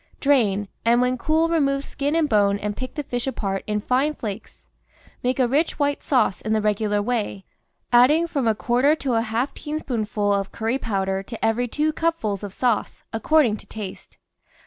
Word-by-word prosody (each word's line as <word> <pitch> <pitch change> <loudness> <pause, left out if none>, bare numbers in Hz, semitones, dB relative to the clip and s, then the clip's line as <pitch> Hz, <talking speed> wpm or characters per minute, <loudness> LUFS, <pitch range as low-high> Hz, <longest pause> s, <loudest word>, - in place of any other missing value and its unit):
Drain, 215 -8 +2 0.2
and 235 +1 +4
when 250 +1 +2
cool 315 +6 +1
remove 280 -4 +1
skin 285 +3 -2
and 325 -2 +2
bone 205 -4 +3
and 205 0 -3
pick 255 -1 -6
the 295 - -3
fish 245 -1 -3
apart 195 -7 -2
in 210 0 0
fine 270 +7 +1
flakes. 205 - -7 0.6
^lake 250 +1 +1
a 255 -2 +3
rich 290 +7 +1
white 285 -1 0
sauce 250 -8 +1
in 220 - -1
the 220 - +2
regular 210 0 0
way, 210 -4 -2 0.5
adding 280 +8 +6
from 280 -7 -1
a 220 - +3
quarter 250 +7 +2
to 275 -5 -2
a 225 - +3
half 230 +4 -1
teaspoonful 220 -9 -2
of 195 -1 -1
curry 230 +4 -1
powder 195 -4 -1
to 225 +3 -5
every 230 +2 +1
two 300 +6 0
cupfuls 305 - -1
of 205 -2 -6
sauce, 240 +1 -1
according 235 0 +3
to - - -15
taste. 205 -4 -8
240 Hz, 185 wpm, -23 LUFS, 210-280 Hz, 0.6 s, adding